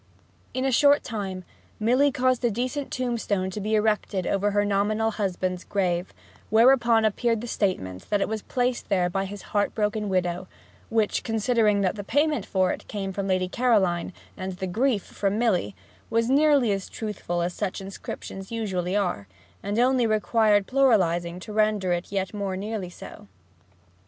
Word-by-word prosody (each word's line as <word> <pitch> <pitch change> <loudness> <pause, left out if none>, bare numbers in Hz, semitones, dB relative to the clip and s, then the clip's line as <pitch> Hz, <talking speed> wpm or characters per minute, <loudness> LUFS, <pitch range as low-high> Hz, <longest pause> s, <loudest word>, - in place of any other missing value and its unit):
In 260 +1 0
a 270 - +2
short 285 +3 +5
time 195 -5 -4 0.4
Milly 255 +6 +3
caused 255 -1 +1
a 240 - +3
decent 255 +6 -3
tombstone 220 -7 -1
to 210 - -5
be 215 +2 0
erected 210 -3 0
over 200 +2 +1
her 205 0 +1
nominal 210 +2 +1
husband's 185 -3 -2
grave, 180 -2 -1 0.4
whereon 230 0 +5
appeared 230 +2 +1
the 235 - -6
statement 95 - -2
that 205 - +2
it - - 0
was 220 0 -3
placed 250 +1 -2
there 180 -2 +2
by 195 +1 -1
his 200 +1 -8
heartbroken 210 0 0
widow, 180 -1 -1 0.4
which, 220 -2 +1
considering 220 -2 +2
that 195 +1 0
the 205 - -4
payment 290 0 +1
for 185 -1 +2
it - - -6
came 195 -2 -4
from 195 0 -3
Lady 185 -1 +1
Caroline 190 -7 +1 0.2
and 190 0 -5
the 185 +1 -5
grief 220 +3 +1
from 200 0 -2
Milly, 185 - +1 0.3
was 230 +2 +1
as 270 -9 +3
truthful 185 -5 -3
as 175 +1 -2
such 200 -1 -3
inscriptions 195 0 -8
usually 190 -5 -2
are, 175 - -1 0.3
and 205 +2 -3
only 250 0 +3
required 215 -1 +3
pluralizing 180 -10 +2
to 210 - -8
render 215 -3 +1
it 175 +2 -4
yet 195 -1 -2
more 200 -2 -3
nearly 205 -2 -4
so. 175 - -11
205 Hz, 160 wpm, -25 LUFS, 190-230 Hz, 0.4 s, short